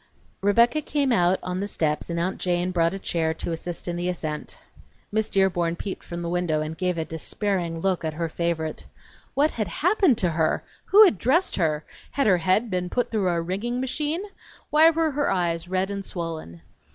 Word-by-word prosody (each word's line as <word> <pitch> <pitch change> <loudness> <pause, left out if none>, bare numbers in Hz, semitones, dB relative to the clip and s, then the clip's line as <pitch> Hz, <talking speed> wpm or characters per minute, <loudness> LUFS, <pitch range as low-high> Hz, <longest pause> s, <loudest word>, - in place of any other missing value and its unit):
Rebecca 235 +9 +4
came 285 -2 0
out 180 -3 +3
on 180 0 -3
the 200 - -2
steps 155 -6 -1
and 170 0 -1
Aunt 180 +3 -2
Jane 180 0 0
brought 170 0 +1
a - - -3
chair 160 -4 -1
to 170 - -4
assist 170 +2 -5
in 175 0 -2
the 175 +1 -1
ascent. 155 -4 -4 0.5
Miss 220 +1 0
Dearborn 175 -3 +2
peeped 195 +2 -6
from 170 0 -6
the 170 - -2
window, 175 -3 0
and 155 +1 -3
gave 180 0 -1
a 160 - -1
despairing 170 +1 -2
look 190 -2 0
at 155 -1 -2
her 165 +1 -1
favorite. 160 -1 -3 0.5
What 290 +3 +3
had 215 -4 -2
happened 345 - +2
to 180 - +2
her? 160 -1 +1 0.2
Who 425 +2 +8
had 215 - +2
dressed 320 +10 +2
her? 155 -4 0 0.2
Had 275 - 0
her 190 -4 +5
head 190 +6 +2
been 180 -1 -1
put 245 +4 -1
through 205 -5 +1
a 170 -1 +1
wringing 200 +9 -2
machine? 300 +7 -2 0.5
Why 315 +2 +7
were 325 -1 +1
her 290 +1 0
eyes 170 -2 0
red 190 +2 -1
and 200 0 -4
swollen? 165 - -6
180 Hz, 200 wpm, -25 LUFS, 170-220 Hz, 0.5 s, Who